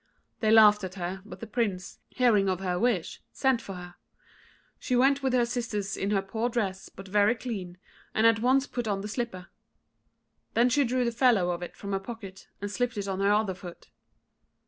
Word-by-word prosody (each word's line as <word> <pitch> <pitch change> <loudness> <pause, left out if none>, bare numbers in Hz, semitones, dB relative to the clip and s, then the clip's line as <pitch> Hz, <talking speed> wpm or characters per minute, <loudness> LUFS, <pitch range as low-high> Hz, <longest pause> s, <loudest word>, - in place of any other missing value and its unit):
They 215 - +1
laughed 210 -2 +7
at 185 0 -5
her; 185 +1 -4
but 210 - -11
the - - -4
Prince, 210 -5 -3
hearing 215 -6 +3
of 185 -1 -1
her 180 -2 -1
wish, 225 -8 0
sent 265 -3 +1
for 195 -4 -8
her. 180 0 -9 0.9
She 250 - -1
went 275 +3 +4
with 265 -1 0
her 245 -1 +3
sisters 225 -5 -3
in 195 - -2
her 195 -2 +1
poor 220 +5 -2
dress, 200 -6 -2
but 195 - -12
very 205 +4 +3
clean, 195 -8 -6 0.4
and 220 - +3
at 230 -1 +5
once 260 +3 +3
put 245 -4 -4
on 200 -2 -1
the 205 - -5
slipper. 210 -6 -5 1.1
Then 240 +2 +4
she 280 +3 +3
drew 250 +1 0
the 235 - 0
fellow 230 -7 +3
of 175 0 -4
it 175 - -7
from 200 - -7
her 195 - 0
pocket, 195 -2 -9
and 205 0 -4
slipped 245 +1 -1
it 200 -1 -3
on 190 -1 -2
her 200 +1 +3
other 210 -2 +2
foot. 180 -2 -12
210 Hz, 205 wpm, -28 LUFS, 195-240 Hz, 1.1 s, laughed